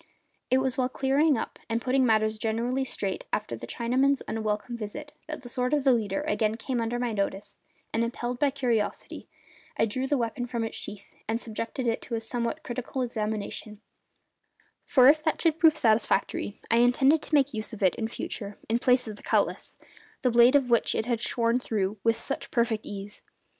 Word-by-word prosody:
It 260 - +4
was 265 0 0
while 255 0 +2
clearing 275 +2 +2
up - - -5
and 225 0 +1
putting 260 +2 +2
matters 215 -1 +2
generally 235 +4 0
straight 200 -7 -4
after 210 - -2
the 115 +1 -8
Chinamen's 260 - +1
unwelcome 220 +2 -2
visit 285 +7 -7
that 305 -3 -6
the - - -8
sword 250 +3 0
of 290 - 0
the 270 - +5
leader 210 -1 0
again 225 -8 0
came 240 +1 -2
under 230 +1 -1
my 245 -2 -1
notice 200 0 -3 0.4
and, 225 - +2
impelled 240 +1 -3
by 290 - +4
curiosity, 245 -6 -2 0.5
I - - +4
drew 255 +5 -2
the 285 - +1
weapon 245 +1 -2
from 235 -2 -2
its 225 - -4
sheath 205 -1 -8
and 225 +1 0
subjected 230 +3 -4
it 230 -1 0
to 235 - -4
a - - -1
somewhat 235 +1 -3
critical 255 +1 -3
examination; 215 -2 -4 1.1
for 255 -2 +6
if 305 +2 +6
that 315 0 0
should 325 -1 +1
prove 315 -2 +5
satisfactory 215 -3 +1
I 230 - +5
intended 265 +6 +4
to 310 - -1
make 280 -1 +3
use 215 +1 -2
of 215 -3 -6
it 185 - +4
in 220 - -3
future 205 -2 -5
in 230 +2 +1
place 250 -1 +3
of 215 -1 -6
the - - -14
cutlass, - - 0 0.5
the 250 - +3
blade 240 +3 +6
of 265 -4 +3
which 235 - +3
it 220 - 0
had 235 -2 -1
shorn 235 0 +1
through 210 -4 -2
with 230 0 +3
such 275 - -3
perfect 230 -3 0
ease. 205 0 -8
235 Hz, 195 wpm, -27 LUFS, 220-260 Hz, 1.1 s, for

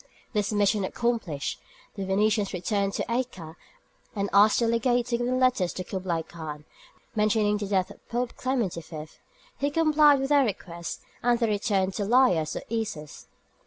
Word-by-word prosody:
This 210 -1 0
mission 205 0 +2
accomplished, 190 -9 -2 0.3
the 195 -2 -4
Venetians 205 +1 +1
returned 195 +2 -1
to - - -2
Acre 230 -10 -3 0.6
and 200 -1 -2
asked 205 +2 +6
the 235 - +2
legate 240 +1 +2
to 240 -1 0
give 240 - -1
them 255 +1 +1
letters 255 -9 +2
to 185 - -4
Kublaï 180 -3 -3
Khan, 150 -3 -8 0.5
mentioning 210 -1 +2
the 205 -1 -4
death 190 -2 0
of - - -17
Pope 240 +1 -2
Clement 255 -8 -1
IV.; 155 -2 -9 0.4
he 285 - +1
complied 300 -2 +5
with 270 0 -2
their 290 -1 +5
request, 170 -6 -5 0.2
and 240 0 +3
they 235 - +1
returned 200 -3 0
to 205 - -2
Laïas 195 -10 +3
or - - -12
Issus. 210 -10 -5
210 Hz, 165 wpm, -27 LUFS, 185-240 Hz, 0.6 s, asked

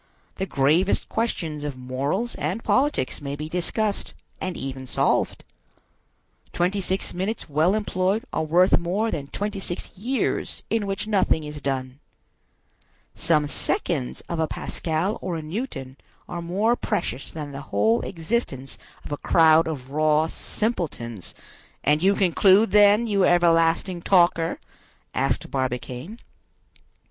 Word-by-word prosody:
The 190 - -2
gravest 155 +8 +2
questions 165 -10 -2
of 145 -3 -4
morals 140 - -2
and 180 +10 -3
politics 275 - +1
may 140 0 -4
be 150 +1 -5
discussed, 200 +5 -2 0.3
and 185 -2 -3
even 130 -1 -5
solved. - - +1 1.1
Twenty 185 +3 0
six 190 +1 -2
minutes 195 +5 -3
well 160 +6 +2
employed 200 0 0
are - - 0
worth 175 +4 +4
more 195 +6 -1
than 140 -2 -4
twenty 205 +5 -3
six 175 -2 -6
years 245 +7 -2
in 225 -3 +1
which 195 +1 -2
nothing 195 -6 +2
is 150 -1 -7
done. 130 -1 -3 1.1
Some 150 -3 +1
seconds 65 - -1
of 170 - -5
a 160 - +2
Pascal 165 +8 -2
or 180 -2 -3
a 160 - -6
Newton 155 - -5 0.3
are 170 - -5
more 200 +8 +1
precious 170 - -3
than 150 -3 -6
the 140 0 -6
whole 110 +4 +2
existence 160 - -3 0.3
of - - -8
a 145 - -1
crowd 160 +1 +5
of 135 -5 -5
raw 155 +1 +3
simpletons—" 160 - -4 0.5
"And 150 +1 +3
you 195 +2 +4
conclude, 195 +3 +4
then, 210 +2 +6
you 200 -4 +2
everlasting 170 +1 +3
talker?" 170 -3 +3 0.5
asked 135 -2 -1
Barbicane. 130 - -3
170 Hz, 135 wpm, -24 LUFS, 145-195 Hz, 1.1 s, then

